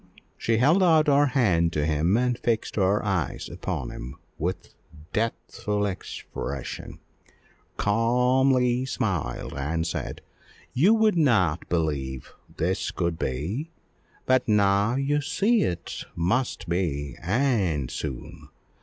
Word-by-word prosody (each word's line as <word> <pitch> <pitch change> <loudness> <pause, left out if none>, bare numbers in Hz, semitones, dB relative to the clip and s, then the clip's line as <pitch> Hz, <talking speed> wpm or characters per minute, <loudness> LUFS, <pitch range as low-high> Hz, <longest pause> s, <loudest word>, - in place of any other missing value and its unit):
She 115 -1 0
held 150 - +4
out 160 -4 +5
her 145 -1 +4
hand 95 -11 +2
to 75 -1 0
him, 80 +6 +2
and 125 0 +1
fixing 110 -3 -1
her 100 +3 +2
eyes 95 -6 -1
upon - - -4
him 65 +3 -8 0.2
with 90 +4 -3 0.4
deathful 105 -2 -1
expression, 70 -8 -6 0.8
calmly 125 +3 +2
smiled, 110 - -2
and 80 +4 -1
said 85 - -4 0.5
"You 185 - +5
would 220 -4 +3
not 95 - +2
believe 70 -6 -2 0.2
this 95 +4 0
could 85 -2 -2
be; 90 - -3 0.6
but 130 0 +2
now 105 +1 +3
you 140 +2 +1
see 210 - +2
it 85 -1 -3
must 95 +7 0
be, 75 -6 -2
and 95 - +1
soon. 70 -6 -6
105 Hz, 115 wpm, -26 LUFS, 85-130 Hz, 0.8 s, out